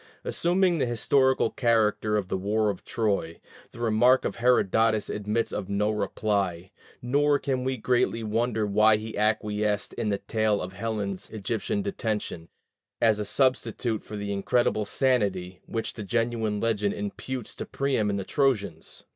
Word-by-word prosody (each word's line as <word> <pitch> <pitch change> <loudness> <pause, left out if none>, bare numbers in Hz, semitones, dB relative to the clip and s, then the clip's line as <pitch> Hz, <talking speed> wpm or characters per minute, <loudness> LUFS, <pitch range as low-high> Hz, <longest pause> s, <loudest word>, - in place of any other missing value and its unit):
Assuming 175 0 +2
the 130 - +1
historical 130 +2 +2
character 110 -3 +2
of 100 -3 -2
the - - -2
war 105 +3 +1
of 95 - -10
Troy, 100 -7 -1 0.3
the 115 - -13
remark 120 +3 +4
of - - -3
Herodotus 110 -2 +2
admits 105 +2 -1
of 95 - -4
no 105 +1 +1
reply; 100 -4 -1 0.3
nor 145 +3 +3
can 130 -3 -2
we 130 0 -1
greatly 120 -1 +1
wonder 110 0 0
that 105 +2 +4
he 110 +1 -7
acquiesced 105 -1 0
in 105 - -2
the 100 - +1
tale 110 0 0
of 90 +1 -5
Helen's 100 -2 -4
Egyptian 115 - -2
detention, 110 - -3 0.5
as 110 -2 +3
a 105 - -2
substitute 125 -3 0
for 105 - -8
the 100 0 -3
"incredible 110 +3 +1
insanity" 100 -7 0
which 115 - -3
the 110 - -8
genuine 115 0 -1
legend 105 -3 0
imputes 115 +4 -5
to - - -7
Priam 135 -7 0
and 100 - -1
the 100 - -3
Trojans. 100 - -1
110 Hz, 155 wpm, -27 LUFS, 100-120 Hz, 0.5 s, remark